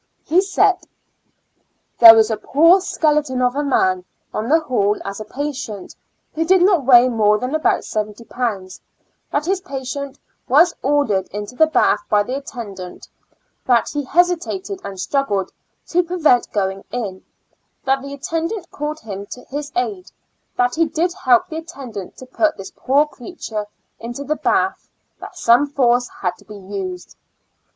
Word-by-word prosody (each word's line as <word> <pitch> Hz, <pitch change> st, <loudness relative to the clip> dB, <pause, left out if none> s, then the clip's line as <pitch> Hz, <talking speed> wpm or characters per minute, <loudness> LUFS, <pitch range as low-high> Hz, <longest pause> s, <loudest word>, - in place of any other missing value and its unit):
He 350 Hz, +4 st, +3 dB
said: 390 Hz, 0 st, +2 dB, 0.6 s
" -, -, -47 dB
There 230 Hz, -1 st, +11 dB
was 220 Hz, 0 st, +4 dB
a -, -, +1 dB
poor 330 Hz, -, +4 dB
skeleton 300 Hz, -7 st, 0 dB
of 250 Hz, +1 st, +1 dB
a 290 Hz, -, 0 dB
man 185 Hz, -10 st, +1 dB, 0.3 s
on 220 Hz, +3 st, -3 dB
the 320 Hz, +3 st, +5 dB
hall 210 Hz, -9 st, 0 dB
as 200 Hz, +1 st, -5 dB
a 215 Hz, -, -6 dB
patient, 260 Hz, -5 st, -6 dB, 0.4 s
who 320 Hz, -, 0 dB
did 365 Hz, +2 st, +4 dB
not 360 Hz, -8 st, +3 dB
weigh 245 Hz, -1 st, +7 dB
more 215 Hz, -3 st, +3 dB
than 250 Hz, +5 st, -4 dB
about 315 Hz, 0 st, +1 dB
seventy 210 Hz, +1 st, -4 dB
pounds; 210 Hz, -7 st, -4 dB, 0.5 s
that 290 Hz, -, 0 dB
this 375 Hz, +3 st, -1 dB
patient 275 Hz, -4 st, -6 dB, 0.3 s
was 315 Hz, +7 st, +5 dB
ordered 260 Hz, -9 st, +1 dB
into 205 Hz, +4 st, -7 dB
the 315 Hz, +4 st, +4 dB
bath 315 Hz, -, +2 dB
by 210 Hz, -2 st, +3 dB
the 250 Hz, +5 st, -4 dB
attendant; 205 Hz, -10 st, -8 dB, 0.6 s
that 240 Hz, -2 st, +3 dB
he 290 Hz, -1 st, -2 dB
hesitated, 360 Hz, +5 st, 0 dB
and 195 Hz, -, -7 dB
struggled 205 Hz, -3 st, -1 dB, 0.4 s
to* 355 Hz, -, +3 dB
prevent 330 Hz, -8 st, +2 dB
going 195 Hz, -1 st, -2 dB
in; 205 Hz, -6 st, -5 dB, 0.6 s
that 270 Hz, 0 st, +1 dB
the 280 Hz, +1 st, -7 dB
attendant 330 Hz, +6 st, -4 dB
called 300 Hz, +1 st, -5 dB
him 200 Hz, -2 st, -7 dB
to 250 Hz, +3 st, -9 dB
his 290 Hz, +1 st, -5 dB
aid; 370 Hz, 0 st, -3 dB, 0.5 s
that 245 Hz, 0 st, +2 dB
he 330 Hz, +1 st, +2 dB
did 335 Hz, +3 st, -1 dB
help 255 Hz, -10 st, +3 dB
the 315 Hz, -, -6 dB
attendant 255 Hz, -, -8 dB
to 260 Hz, -, -10 dB
put 310 Hz, +5 st, 0 dB
this 195 Hz, 0 st, -9 dB
poor 280 Hz, +3 st, +2 dB
creature 235 Hz, -, -7 dB, 0.3 s
into 240 Hz, +4 st, -6 dB
the 300 Hz, +2 st, -1 dB
bath; -, -, 0 dB, 0.3 s
that -, -, -10 dB
some 245 Hz, +5 st, +4 dB
force 245 Hz, -3 st, +2 dB
had 180 Hz, -1 st, 0 dB
to -, -, -20 dB
be 210 Hz, -1 st, -10 dB
used." 190 Hz, -2 st, -7 dB
260 Hz, 160 wpm, -19 LUFS, 215-315 Hz, 0.6 s, There